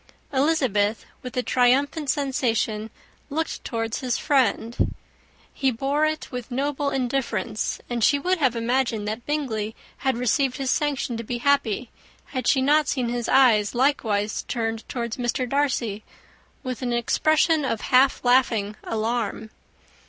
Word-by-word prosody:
Elizabeth, 260 Hz, -8 st, +1 dB, 0.2 s
with 255 Hz, 0 st, -8 dB
a 250 Hz, -, +1 dB
triumphant 275 Hz, +5 st, +2 dB
sensation, 230 Hz, -6 st, 0 dB, 0.4 s
looked 320 Hz, +3 st, -3 dB
towards 225 Hz, -1 st, -3 dB
his 250 Hz, -2 st, -1 dB
friend. 245 Hz, -5 st, +1 dB, 0.6 s
He 270 Hz, -, +1 dB
bore 275 Hz, +5 st, +1 dB
it 310 Hz, 0 st, -4 dB
with 250 Hz, -2 st, -6 dB
noble 280 Hz, +2 st, -1 dB
indifference; 245 Hz, -6 st, -2 dB
and 240 Hz, -2 st, -2 dB
she 285 Hz, -, +5 dB
would 360 Hz, +5 st, 0 dB
have 260 Hz, -5 st, +2 dB
imagined 230 Hz, -2 st, 0 dB
that 220 Hz, +3 st, -4 dB
Bingley 225 Hz, -8 st, -2 dB, 0.2 s
had 265 Hz, -3 st, 0 dB
received 250 Hz, +2 st, +1 dB
his 270 Hz, -2 st, -1 dB
sanction 280 Hz, -5 st, -1 dB
to 230 Hz, -, -5 dB
be 240 Hz, +2 st, -3 dB
happy, 245 Hz, -3 st, +1 dB, 0.4 s
had 255 Hz, -3 st, -2 dB
she 265 Hz, -2 st, +3 dB
not 295 Hz, +1 st, +4 dB
seen 250 Hz, -3 st, 0 dB
his 240 Hz, -1 st, -2 dB
eyes 240 Hz, -5 st, +4 dB
likewise 220 Hz, -6 st, +1 dB
turned 225 Hz, -2 st, -3 dB
towards 235 Hz, -2 st, -3 dB
Mr. 250 Hz, +1 st, -1 dB
Darcy, 245 Hz, -6 st, -1 dB, 0.6 s
with 255 Hz, -1 st, -4 dB
an 245 Hz, -1 st, -1 dB
expression 310 Hz, +6 st, +2 dB
of 230 Hz, -5 st, -1 dB
half 260 Hz, 0 st, +3 dB
laughing 235 Hz, -5 st, +3 dB
alarm. 225 Hz, -1 st, -2 dB
250 Hz, 140 wpm, -24 LUFS, 225-275 Hz, 0.6 s, she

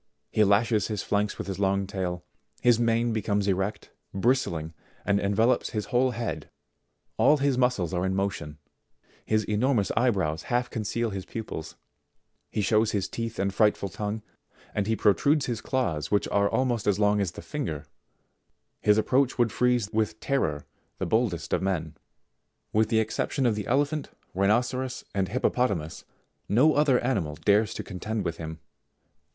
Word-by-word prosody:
He 110 Hz, -, +4 dB
lashes 105 Hz, +1 st, +3 dB
his 105 Hz, -2 st, -3 dB
flanks 105 Hz, 0 st, 0 dB
with -, -, -4 dB
his 95 Hz, -1 st, -5 dB
long 100 Hz, 0 st, +1 dB
tail; 90 Hz, -2 st, -3 dB, 0.4 s
his 120 Hz, -2 st, +4 dB
mane 115 Hz, 0 st, +2 dB
be 110 Hz, -, -1 dB
comes 100 Hz, 0 st, 0 dB
erect, 95 Hz, +2 st, -1 dB, 0.2 s
bristling, 95 Hz, -8 st, 0 dB, 0.3 s
and 100 Hz, 0 st, +2 dB
envelopes 110 Hz, +6 st, +1 dB
his 105 Hz, -, -1 dB
whole 130 Hz, +2 st, +4 dB
head; 110 Hz, -11 st, -4 dB, 0.7 s
all 150 Hz, -, +5 dB
his 140 Hz, -1 st, +1 dB
muscles 125 Hz, -9 st, +1 dB
are 90 Hz, 0 st, 0 dB
in 95 Hz, 0 st, 0 dB
motion; 95 Hz, -6 st, -3 dB, 0.7 s
his 110 Hz, 0 st, +1 dB
enormous 105 Hz, +1 st, +1 dB
eye 125 Hz, -, +4 dB
brows 85 Hz, -7 st, -1 dB
half 120 Hz, 0 st, 0 dB
conceal 115 Hz, +1 st, -2 dB
his 95 Hz, -1 st, -4 dB
pupils; 110 Hz, -8 st, -6 dB, 0.7 s
he 105 Hz, -, -1 dB
shows 110 Hz, +2 st, +2 dB
his 100 Hz, -2 st, 0 dB
teeth 115 Hz, -1 st, -5 dB
and 100 Hz, 0 st, 0 dB
frightful 105 Hz, -1 st, +2 dB
tongue, 105 Hz, +4 st, -4 dB, 0.5 s
and 105 Hz, -1 st, -1 dB
he 110 Hz, -, +2 dB
protrudes 135 Hz, -, +3 dB
his 120 Hz, -3 st, -3 dB
claws 90 Hz, -, -1 dB
which 105 Hz, -, +1 dB
are 100 Hz, 0 st, +2 dB
almost 120 Hz, -5 st, 0 dB
as 100 Hz, -2 st, +3 dB
long 105 Hz, 0 st, +3 dB
as 90 Hz, -4 st, -1 dB
the -, -, -8 dB
finger; 80 Hz, -, -4 dB, 0.9 s
his 105 Hz, 0 st, +4 dB
approach 130 Hz, +4 st, +2 dB
would 120 Hz, -3 st, +2 dB
freeze 125 Hz, -3 st, +1 dB
with 110 Hz, 0 st, 0 dB
terror 75 Hz, -, -1 dB, 0.3 s
the -, -, -2 dB
boldest 95 Hz, -8 st, 0 dB
of -, -, +2 dB
men. 85 Hz, -5 st, -2 dB, 0.8 s
With 110 Hz, 0 st, +3 dB
the 110 Hz, -, +2 dB
excep 110 Hz, -, -1 dB
tion 135 Hz, -, 0 dB
of 120 Hz, -, +3 dB
the 105 Hz, -1 st, -4 dB
elephant, 145 Hz, +3 st, 0 dB, 0.2 s
rhinoceros, 120 Hz, +6 st, 0 dB
and 95 Hz, -2 st, 0 dB
hippopotamus, 100 Hz, -8 st, -1 dB, 0.4 s
no 135 Hz, +9 st, +5 dB
other 145 Hz, -4 st, +4 dB
animal 100 Hz, -, -1 dB
dares 105 Hz, +5 st, +2 dB
to -, -, -4 dB
contend 105 Hz, +3 st, -4 dB
with 85 Hz, -1 st, -2 dB
him. 80 Hz, -1 st, -6 dB
105 Hz, 165 wpm, -27 LUFS, 95-120 Hz, 0.9 s, all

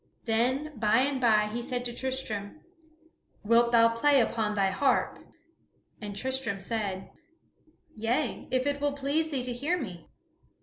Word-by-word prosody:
Then 255 Hz, +5 st, 0 dB
by 215 Hz, +3 st, +3 dB
and 270 Hz, -1 st, 0 dB
by 215 Hz, -3 st, +3 dB
he 240 Hz, -, -2 dB
said 250 Hz, 0 st, -3 dB
to 240 Hz, -, -3 dB
Tristram, 260 Hz, -1 st, -4 dB, 0.8 s
"Wilt 235 Hz, +2 st, +4 dB
thou 230 Hz, -1 st, +6 dB
play 275 Hz, +5 st, +3 dB
upon 220 Hz, -3 st, 0 dB
thy 195 Hz, -1 st, +2 dB
harp?" 270 Hz, +8 st, +1 dB, 0.8 s
And 205 Hz, -1 st, -6 dB
Tristram 260 Hz, -2 st, -2 dB
said, 195 Hz, -2 st, -4 dB, 0.8 s
"Yea, 240 Hz, +3 st, -2 dB
if 255 Hz, 0 st, 0 dB
it 285 Hz, 0 st, -1 dB
will 290 Hz, -1 st, +1 dB
please 285 Hz, +3 st, 0 dB
thee 270 Hz, -5 st, -2 dB
to 250 Hz, 0 st, 0 dB
hear 300 Hz, +9 st, -1 dB
me." 185 Hz, -, -7 dB
240 Hz, 145 wpm, -28 LUFS, 215-275 Hz, 0.8 s, thou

